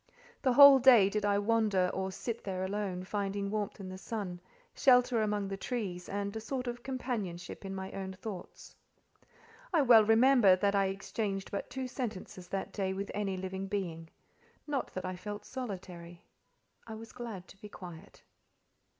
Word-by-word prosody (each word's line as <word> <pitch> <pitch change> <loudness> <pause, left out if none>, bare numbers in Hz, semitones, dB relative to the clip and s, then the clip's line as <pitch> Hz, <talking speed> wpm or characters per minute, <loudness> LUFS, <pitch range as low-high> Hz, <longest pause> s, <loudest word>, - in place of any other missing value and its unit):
The 260 -3 +2
whole 280 +1 +10
day 235 -7 +7
did 210 0 -1
I 200 0 +3
wander 205 -3 +2
or 190 0 -2
sit 230 +4 -5
there 185 -1 -3
alone, 190 -2 -3
finding 200 0 -2
warmth 210 -1 -3
in 195 - -7
the 185 0 -8
sun, 195 -5 -5 0.3
shelter 250 -3 +4
among 210 -2 0
the 195 0 -4
trees, 195 -6 -4
and 200 +1 -3
a 220 - -4
sort 255 +3 -3
of 240 0 -4
companionship 230 -11 -4
in 195 0 -5
my 190 0 -5
own 190 -1 -5
thoughts. 190 0 -9 1.0
I 325 -5 +4
well 235 -4 +8
remember 225 -2 +6
that 200 +2 +1
I 195 -1 +3
exchanged 195 0 -3
but 200 - -4
two 260 +1 -4
sentences 210 -8 -6
that 195 -1 -4
day 190 -2 -1
with 200 +1 -4
any 195 -2 -2
living 190 +1 -4
being: 170 -5 -4 0.6
not 285 -3 -2
that 185 - -4
I 185 0 -3
felt 205 +3 -7
solitary; 180 -8 -7 0.6
I 220 - -6
was 225 +1 -10
glad 225 -7 -7
to 195 - -16
be 210 - -9
quiet. 175 -5 -11
200 Hz, 170 wpm, -32 LUFS, 190-230 Hz, 1.0 s, whole